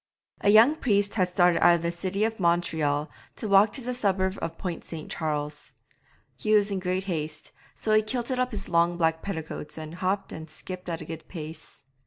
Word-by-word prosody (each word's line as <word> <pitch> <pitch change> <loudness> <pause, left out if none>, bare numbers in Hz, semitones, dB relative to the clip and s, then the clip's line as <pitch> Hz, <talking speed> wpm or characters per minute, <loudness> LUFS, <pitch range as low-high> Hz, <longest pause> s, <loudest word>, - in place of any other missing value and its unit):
A - - +2
young 230 +9 +7
priest 205 -6 +1
had 185 -4 +1
started 180 -1 +3
out 175 - +7
of 170 - -2
the 170 - 0
city 190 +4 -2
of 220 0 -1
Montreal 160 -4 +1 0.3
to 220 - -5
walk 200 +1 +6
to 270 - 0
the 250 +1 -3
suburb 190 -5 0
of 165 0 -4
Point 175 -3 -4
St. 160 -2 -8
Charles. 150 -2 -3 0.6
He 215 0 +2
was 205 -1 +3
in 195 - -1
great 185 +1 -1
haste, 155 -5 -4 0.2
so 215 - 0
he 215 - +6
kilted 245 +3 -2
up 255 0 +1
his 205 -5 -6
long 170 0 +2
black 160 -1 +1
petticoats 160 -5 -6
and 155 0 -7
hopped 190 +2 -1
and 160 0 -8
skipped 180 +3 -8
at 165 0 -3
a - - -7
good 160 +1 -8
pace. 160 -2 -9
180 Hz, 205 wpm, -27 LUFS, 160-205 Hz, 0.6 s, young